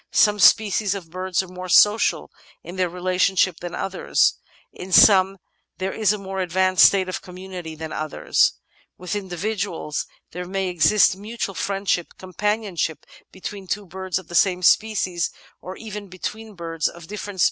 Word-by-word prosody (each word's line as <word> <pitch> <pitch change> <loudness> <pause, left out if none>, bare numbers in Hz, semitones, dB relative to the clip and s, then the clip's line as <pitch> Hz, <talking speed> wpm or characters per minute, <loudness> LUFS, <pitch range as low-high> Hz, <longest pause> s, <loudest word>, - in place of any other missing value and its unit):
Some 210 -1 +3
species 205 -1 +4
of 170 -5 -9
birds 185 +1 -1
are - - -11
more 180 0 -8
social 210 +4 +4 0.3
in 175 - -9
their 185 -1 0
relationship 185 0 +1
than 175 0 -6
others; 195 - +1 0.4
in 185 +1 -9
some 195 0 +6 0.4
there 190 +1 -3
is 215 -3 +2
a 210 - -1
more 195 -1 -6
advanced 185 +1 +5
state 190 -2 +1
of 185 - -4
community 180 -3 -8
than 160 0 -7
others. 155 -1 +1 0.4
With 180 +3 -5
individuals 190 -4 -3 0.2
there 180 +1 -6
may 190 0 -2
exist 180 +3 +4
mutual 210 +1 -5
friendship; 195 -2 -2
companionship 190 -3 -2 0.3
between 195 +1 -8
two 205 +2 -3
birds 185 0 -4
of 190 -3 -8
the 175 - -12
same 180 +1 +2
species, 185 -4 +2 0.3
or 185 +1 -8
even 210 -2 -8
between 215 +4 -7
birds 165 -2 -2
of 170 - -9
diflFerent - - -10
species, 200 - -11
is 210 - -5
often 205 -2 -7
seen. - - -9
185 Hz, 170 wpm, -22 LUFS, 180-200 Hz, 0.4 s, some